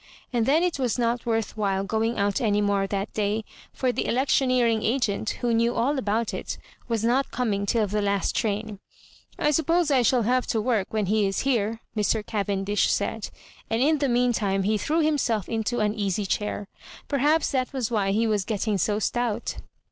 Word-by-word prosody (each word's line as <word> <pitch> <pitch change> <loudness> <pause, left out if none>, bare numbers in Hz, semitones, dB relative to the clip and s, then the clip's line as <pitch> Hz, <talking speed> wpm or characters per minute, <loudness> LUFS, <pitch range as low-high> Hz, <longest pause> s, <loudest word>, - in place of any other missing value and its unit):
And 235 -2 +1
then 310 +5 +4
it 355 -5 0
was 250 -3 0
not 240 0 0
worth 225 -2 -1
while 195 -3 0
going 225 +3 -1
out 200 -1 +1
any 210 -3 +2
more 200 -1 +1
that 200 +1 -3
day 210 +1 0 0.2
— - - -22
for 255 -2 0
the - - -2
electioneering 250 -3 +2
agent, 220 -3 0
who 240 -1 +1
knew 235 +1 +2
all 275 +4 +1
about 225 0 -1
it, - - -4 0.3
was 230 -2 -1
not 250 +4 +2
coming 205 -5 -1
till 220 +1 +2
the 210 +1 -1
last 200 -1 0
train. 210 -2 -2 0.3
" - - -28
I 300 - +2
suppose 325 +2 +2
I 265 -2 +4
shall 245 0 +3
have 250 +3 +1
to 225 - 0
work 215 -3 0
when 215 -2 0
he 210 +1 +2
is 195 - -1
here,*' 230 -4 0
Mr. 210 0 0
Cavendish 205 -1 0
flaid. - - -2 0.4
And 225 - 0
in 305 +1 +3
the 280 -2 +1
mean 245 0 +2
time 195 -3 0
he 215 +3 +1
threw 320 +8 +1
himself 280 - +1
into 225 +1 -1
an 210 0 +1
easy 205 -1 -1
chair. 205 +1 -2 0.4
Per» 280 - -1
haps 300 +4 +2
that 255 -2 0
was 255 -4 -2
why 205 -4 +1
he 215 +4 +2
was 210 -3 +1
getting 210 -1 -1
so 205 +3 +1
stout. 235 +1 -1
225 Hz, 200 wpm, -25 LUFS, 205-250 Hz, 0.4 s, then